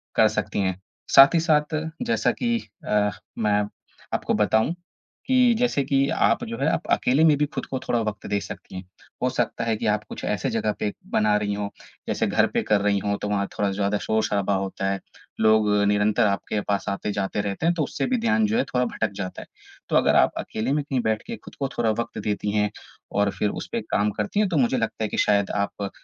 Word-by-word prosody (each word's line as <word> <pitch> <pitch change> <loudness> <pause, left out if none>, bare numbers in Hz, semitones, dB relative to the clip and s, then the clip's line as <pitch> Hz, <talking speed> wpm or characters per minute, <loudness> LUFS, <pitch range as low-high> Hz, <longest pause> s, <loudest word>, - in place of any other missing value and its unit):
कर - - +6
सकती - - -1
हैं। 95 -2 -1 0.4
साथ 135 +4 +9
ही - - +5
साथ 155 -1 +2 0.3
जैसा 235 - +2
कि 235 -1 0 0.3
अ, 105 -1 +2 0.3
मैं 105 -2 +2 0.5
आपको - - 0
बताऊँ 110 +8 +2 0.5
कि 250 -2 +5
जैसे 240 - +1
कि 135 0 +2
आप 115 +3 +2
जो 115 +1 -5
है 140 - +1
आप - - -2
अकेले 135 +6 +3
में 155 -2 +6
भी 150 - +2
ख़द - - -3
को 130 - -1
थोड़ा 120 - +2
वक़्त 105 -2 -4
दे 100 - 0
सकती 95 - -9
हैं। 95 - -5 0.4
हो 125 - +3
सकता 120 -2 -1
है 115 -1 0
कि - - -4
आप 105 0 +1
कुछ - - -8
ऐसी - - -1
ज़गह 105 - 0
पे 105 - -1 0.2
बना 105 -1 +3
रही 105 -1 -1
हों, 100 0 -2 0.4
जैसे - - 0
घर - - +3
पे - - +2
कर 105 -1 +3
रही 100 -1 +2
हों 100 +1 -1
तो 105 - -2
वहाँ 100 -1 0
थोड़ा 100 - +1
ज़्यादा 100 +1 0
शोर-शराबा 105 -2 +1
होता 95 0 -2
है, 95 - -2 0.4
लोग 110 -1 +4 0.2
निरंतर 105 +1 +3
आपके 100 +1 -1
पास 100 -1 0
आते-जाते 100 0 -2
रहते 100 +8 -3
हैं। 170 +1 +3
तो 160 - 0
उससे - - -2
भी - - +3
ध्यान 230 -1 +2
जो 220 +2 0
है 250 - +3
थोड़ा 125 0 +2
भटक 110 -2 -2
जाता 95 -2 -5
है। - - -12 0.4
तो - - 0
अगर - - +4
आप - - +5
अकेले 110 +4 -3
में 150 - 0
कहीं 135 -3 -1
बैठ 110 -1 0
के 235 - -4
ख़ुद - - -14
को 140 - 0
थोड़ा 115 -2 +2
वक़्त 115 - -6
देती 105 0 -1
हैं 105 0 +2 0.4
और 100 0 +1
फिर 105 - +2
उस - - -7
पे 235 - -1
काम 105 - 0
करती 105 - -1
हैं 210 -3 +2
तो 170 - 0
मुझे 130 -1 +2
लगता 115 -1 -2
है - - +1
कि - - -4
शायद 100 -1 +3 0.2
आप 100 -1 -6
110 Hz, 230 wpm, -24 LUFS, 100-135 Hz, 0.5 s, साथ